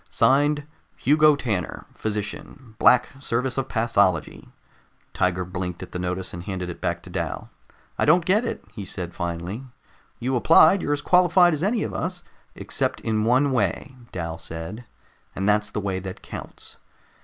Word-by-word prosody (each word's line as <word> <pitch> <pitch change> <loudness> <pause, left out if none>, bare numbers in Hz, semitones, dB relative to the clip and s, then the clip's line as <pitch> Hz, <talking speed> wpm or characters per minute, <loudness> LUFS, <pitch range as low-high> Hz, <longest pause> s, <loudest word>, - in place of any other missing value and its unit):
Signed, 145 +5 +3 0.3
Hugo 150 +1 +5
Tanner, 110 -10 -3
Physician, 110 +4 -5
Black 125 - +5
Service 125 0 -1
of 135 -1 -2
Pathology.'" 100 - +1 0.6
Tiger 90 0 0
blinked 90 -1 -5
at - - -10
the 90 - -4
notice 90 +1 -3
and 85 - -6
handed 90 -1 -4
it - - -11
back - - -2
to - - -11
Dal. - - -4 0.5
"I - - +3
don't 175 -1 +4
get 205 +6 +3
it," 235 - -4
he 105 - -6
said 90 -2 -5
finally. 85 +6 -4 0.5
"You 130 +2 -1
applied, 160 +8 +6
you're 145 - 0
as 145 0 -3
qualified 180 -1 +5
as 150 - -2
any 210 +4 +1
of - - -4
us 180 -1 -3 0.2
" - - -35
"Except - - -2
in 110 -1 0
one 130 +4 +3
way," 120 - -1 0.2
Dal 80 -2 -4
said, 80 +8 -7 0.5
"and 95 +1 -1
that's 105 0 +2
the - - -3
way 95 -2 -2
that 95 0 -8
counts. - - -10
110 Hz, 165 wpm, -24 LUFS, 90-145 Hz, 0.6 s, applied